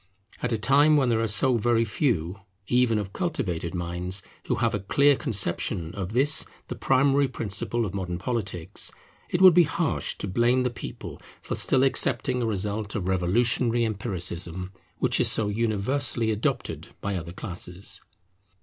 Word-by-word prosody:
At 125 - -1
a 115 - +1
time 145 +7 +4
when 130 -3 +2
there 115 -1 +2
are 115 - +1
so 125 +4 +3
very 115 +1 +2
few, 100 - -1 0.3
even 125 -1 +2
of 100 -2 -4
cultivated 90 - -2
minds, 90 +2 -2 0.2
who - - 0
have - - 0
a - - -1
clear 140 +9 +3
conception 95 -5 -1
of 100 0 -5
this 145 +5 +4 0.3
the - - -4
primary 135 +1 +3
principle 115 0 -2
of 95 - -5
modern 90 -3 -3
politics, 95 -5 -4 0.4
it 175 +2 +1
would 185 -2 +10
be 175 - +7
harsh 160 +1 -2
to - - -4
blame 120 +6 +2
the 125 - 0
people 110 - -8 0.2
for - - -4
still 130 - +3
accepting 130 -2 +1
a 115 - 0
result 105 0 -2
of 95 -4 -2
revolutionary 115 +6 +2
empiricism, 95 -4 -3 0.3
which - - +1
is - - +3
so 105 -2 0
universally 115 +2 0
adopted 105 0 -2
by 100 -1 -3
other 85 -2 -5
classes. 90 +1 -5
110 Hz, 160 wpm, -26 LUFS, 95-125 Hz, 0.4 s, would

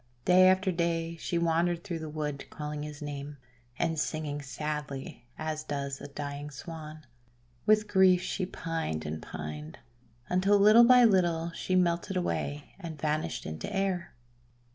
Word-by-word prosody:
Day 185 +1 +7
after 190 +1 +3
day 170 -1 -1
she 170 - -2
wandered 170 +1 +1
through 170 -3 -4
the 160 -1 -6
wood 150 -2 -4
calling 150 0 -5
his 150 0 -7
name, 145 0 -6 0.4
and 165 -1 0
singing 150 -1 -2
sadly 140 -3 -5
as 155 -1 -3
does 140 -2 -4
a - - -6
dying 145 0 -5
Swan. 155 +1 -9 0.6
With 215 0 +4
grief 190 -2 +5
she 185 -1 -2
pined 165 - -3
and 80 +1 -4
pined, 75 0 -7 0.5
until 190 +3 +3
little 215 +4 +8
by 250 0 +7
little 170 -5 +2
she 185 +2 -2
melted 180 +1 +1
away 145 -4 -2
and 165 -5 -7
vanished 155 +1 -1
into 80 - -5
air. 195 -5 -1
160 Hz, 145 wpm, -30 LUFS, 145-180 Hz, 0.6 s, little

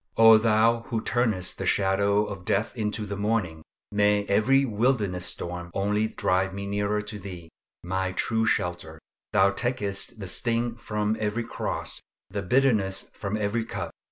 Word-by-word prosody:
O 115 -1 +8
Thou 115 +1 +3
who 115 -3 -1
turnest 110 -6 0
the - - -2
shadow 100 +1 +2
of 100 -3 -7
death 105 +3 0
into 105 -1 -2
the 100 0 -4
morning, 100 -6 -1 0.3
may 105 0 +2
every 135 +8 +3
wilderness 105 -6 0
storm 85 0 -4
only 105 +2 +1
drive 95 -2 0
me 100 0 -4
nearer 100 +1 0
Thyself, 95 -5 -8 0.3
my 95 +1 -1
true 110 +3 0
shelter. 85 -5 -1 0.3
Thou 100 -1 +4
takest 110 -5 -2
the 95 - -6
sting 115 +3 0
from 105 -2 -2
every 110 +2 -1
cross, 115 - -5 0.3
the 100 0 -2
bitterness 105 -3 +1
from 100 +1 -3
every 110 +2 -1
cup. - - -5
105 Hz, 150 wpm, -26 LUFS, 95-115 Hz, 0.3 s, O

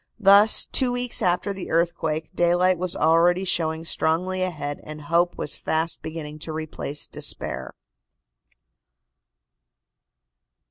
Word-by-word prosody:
Thus, 205 +1 +6
two 255 -2 +1
weeks 245 0 0
after 180 +3 +1
the 190 -2 -7
earthquake, 160 -2 -1
daylight 175 +1 +3
was 180 -1 -2
already 170 +4 +3
showing 160 -2 -1
strongly 180 +4 0
ahead 150 -6 -3
and 155 0 -9
hope 170 +3 +1
was - - -5
fast 160 +1 -2
beginning 155 -1 -7
to 160 - -5
replace 155 -2 -4
despair. - - -4
170 Hz, 110 wpm, -24 LUFS, 160-185 Hz, -, Thus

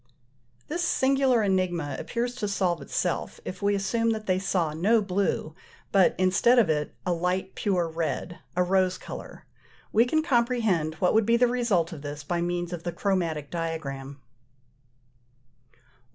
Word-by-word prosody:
This 345 +3 -2
singular 265 -6 +3
enigma 175 -7 0
appears 240 +1 -2
to 210 - -2
solve 185 -4 0
itself, - - -2
if 185 - -6
we 200 0 +2
assume 230 +4 0
that 215 -1 -5
they 185 -2 +1
saw 180 -5 0
no 205 +9 +3
blue, 195 -5 -1 0.4
but, 195 -2 +4
instead 195 +7 +4
of 210 -9 +5
it, 150 -1 -2
a 180 - +1
light 180 +2 -1
pure 180 -4 0
red, 165 +1 -3 0.2
a 180 - +3
rose 185 0 +2
colour. - - -9 0.5
We 230 +2 +5
can 315 +5 +1
comprehend 235 - +1
what 180 +3 +1
would 220 -1 +3
be 235 0 +4
the 245 - +5
result 225 -10 +1
of 150 - -8
this 145 0 -6
by 170 +3 -1
means 175 0 -2
of 170 - -5
the 175 - -3
chromatic 170 -5 -1
diagram. 155 -5 -4 1.6
112. 120 - -32
185 Hz, 160 wpm, -27 LUFS, 165-220 Hz, 1.6 s, of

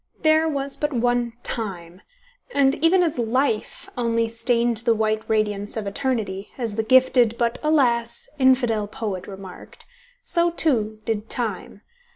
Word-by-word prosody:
There 315 0 +4
was 275 -2 -3
but 295 - -1
one 245 -1 0
Time, 185 -5 -4 0.5
and 275 -1 +4
even 360 +2 +5
as 315 -7 -1
Life 235 0 -1
only 230 -1 0
stained 235 0 +1
the 230 +1 +1
white 215 0 0
radiance 210 -1 -1
of 215 - -3
eternity, 200 -3 -2
as 230 -5 -3
the 220 - 0
gifted 245 -1 +4
but, 235 0 0
alas! 240 -6 +1
infidel 245 -5 +3
poet 200 -4 -5
remarked, 195 -2 -11 0.4
so, 345 -7 +1
too, 220 -11 +1
did 220 -1 -3
Time. 215 -4 -3
235 Hz, 140 wpm, -23 LUFS, 215-260 Hz, 0.5 s, even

